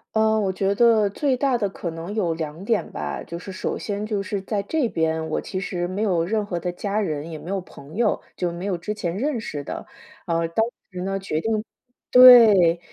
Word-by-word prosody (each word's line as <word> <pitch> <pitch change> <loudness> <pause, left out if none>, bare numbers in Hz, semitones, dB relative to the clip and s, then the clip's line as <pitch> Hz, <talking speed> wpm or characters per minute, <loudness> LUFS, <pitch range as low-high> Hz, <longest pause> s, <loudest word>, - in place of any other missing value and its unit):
嗯， 220 0 +3
我 195 -2 0
觉 195 +1 0
得 220 -1 +4
最 265 +3 0
大 270 -1 +1
的 210 -4 0
可 175 -2 -5
能 165 +6 -6
有 175 -6 0
2 160 +3 -6
点 225 -2 0
吧， - - -4
就 170 - -7
是 190 +2 -8
首 185 - -3
先 205 0 -4
就 205 -3 -1
是 200 0 -3
在 200 +1 -2
这 260 +2 0
边， 160 0 -1
我 - - -1
其 185 - -5
实 175 -2 -3
没 190 +3 -4
有 180 -6 +1
任 215 +3 0
何 175 -4 -3
的 175 +1 -3
家 200 +3 -2
人， 155 -5 -3
也 160 - -6
没 175 +5 -8
有 195 - -1
朋 155 -2 -13
友， 225 -2 +1 0.2
就 175 -1 -2
没 175 +3 -6
有 195 - 0
之 210 +5 -4
前 175 -4 -3
认 270 +3 -1
识 150 -10 -5
的。 - - -6 0.4
啊， 165 0 0
当 220 +7 +1 0.3
时 180 -1 -6
呢， 195 0 -2
决 175 -5 -2
定 220 +1 -1 0.5
对， 220 -9 +8
195 Hz, 235 characters per minute, -23 LUFS, 170-215 Hz, 0.5 s, 对